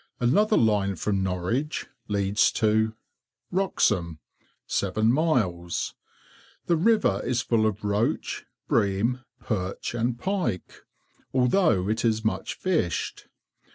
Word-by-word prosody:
Another 205 - +3
line 100 -3 +2
from 100 +3 -1
Norwich 95 - -1 0.2
leads 100 0 +2
to— 110 0 +2 0.6
WROXHAM. 105 - +1 0.5
7 110 +4 +1
miles. 110 - 0 0.7
The 170 - +3
river 195 - +2
is 120 -2 0
full 110 -2 +2
of 105 0 -3
roach, 105 +2 -1 0.2
bream, 110 +6 +1 0.2
perch, 100 -3 -3
and 120 0 -1
pike, 180 - -3 0.5
although 125 - +3
it 110 +2 0
is 110 -1 +1
much 110 - -1
fished. 165 - -1
110 Hz, 105 wpm, -26 LUFS, 100-130 Hz, 0.7 s, Another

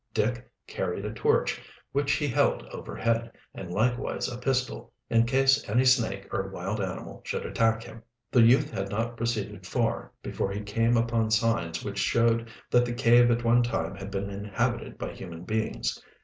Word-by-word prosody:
Dick 120 +3 0 0.2
carried - - -3
a - - -4
torch, - - +1 0.3
which 140 +1 +1
he 150 - 0
held 125 - +2
overhead, 115 0 -2 0.2
and 90 - -7
likewise 120 +6 0
a 120 - -5
pistol, 130 0 -1 0.2
in 115 0 +4
case 135 +1 +3
any 125 +5 +3
snake 110 -6 +2
or 95 0 -1
wild 100 +2 -3
animal 95 -2 -5
should - - -3
attack 115 0 +1
him. 115 - -11 0.3
The 125 - +5
youth 130 +6 +5
had 100 0 -3
not 115 +3 -2
proceeded 115 -3 -3
far - - -1
before 95 - -2
he 100 +1 -3
came 115 +3 +1
upon 115 -1 +1
signs 110 -7 +1
which 100 -1 -3
showed 115 0 +2 0.2
that 120 - +5
the 120 0 -2
cave 120 0 +5
at 120 0 +1
one 120 +1 +5
time 120 -1 -1
had 95 0 -7
been 100 0 -3
inhabited 100 0 -2
by - - -4
human 85 -3 -9
beings. 110 - -2
115 Hz, 175 wpm, -28 LUFS, 100-120 Hz, 0.3 s, The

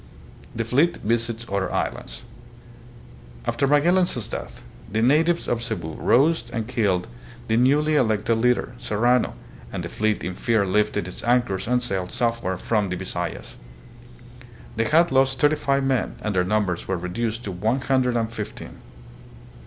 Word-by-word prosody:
The 115 - -1
Fleet 140 +9 +2
Visits 115 +1 -1
Other 100 -1 -1
Islands. - - -3 1.2
After 140 - +1
Magellan's 150 - +2
death, - - -7 0.3
the 110 +2 +1
natives 165 +7 +3
of 120 -1 0
Cebu 85 -9 -4
rose 140 - +2
and 115 -2 -3
killed 100 -7 0 0.4
the 110 - +1
newly 145 +6 +3
Magellan 130 -7 +3
Monument, 110 -1 -1
Manila. 115 -1 +2
elected - - -3
leader, 125 0 +1
Serrano, 120 - +1 0.4
and - - -4
the - - -5
fleet 110 -1 -1
in 90 - -3
fear 110 +2 +1
lifted 105 0 0
its 90 - -8
an 120 +1 +4
chors 95 -4 -4
and 125 0 +2
sailed 95 -6 -2
southward 115 -6 -1
from 105 -4 0
the 90 - -2
Bisayas. - - -5 1.2
They 115 0 +1
had 165 +5 +4
lost 135 0 +2
thirty 150 +1 +4
five 140 -2 0
men 135 -2 0
and 105 -2 -2
their 90 -1 +2
numbers 100 -3 0
were 95 - -1
reduced 110 +6 -3
to 100 - -4
one 110 +9 0
hundred 130 -2 +1
and 115 0 -2
fifteen. 105 -2 -7
115 Hz, 165 wpm, -23 LUFS, 105-130 Hz, 1.2 s, an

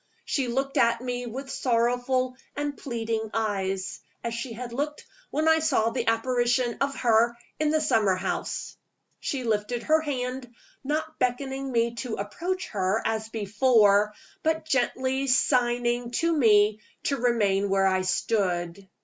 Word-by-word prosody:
She 270 -3 0
looked 270 +4 -1
at 235 -3 +3
me 245 -1 -3
with 265 +4 -6
sorrowful 245 +1 +1 0.2
and 290 0 -2
pleading 225 -4 -3
eyes, 195 -4 -1 0.2
as 235 - -2
she 230 +1 -4
had 240 +1 -7
looked 295 +4 -3 0.2
when 310 +2 0
I 320 0 +5
saw 265 -8 +2
the - - -2
apparition 240 +1 +1
of 275 0 0
her 235 0 +3 0.2
in 305 -1 +2
the 310 0 +2
summer 215 -10 +3
house. 185 - -3 0.4
She 270 -4 -3
lifted 225 +1 -1
her 315 0 +3
hand 255 -4 -4 0.3
not 310 +3 -3
beckoning 265 +2 -1
me 235 -1 +1
to 240 -2 -3
approach 355 - -3
her, 195 +1 0
as 220 0 -1
before, 210 -1 +3 0.3
but 320 0 0
gently 260 0 0
signing 245 -2 +2
to 335 +7 +1
me 215 -5 +4 0.2
to 280 - 0
remain 205 -5 +2
where 195 0 +3
I 190 -1 +3
stood. 185 -2 -1
240 Hz, 145 wpm, -26 LUFS, 220-270 Hz, 0.4 s, I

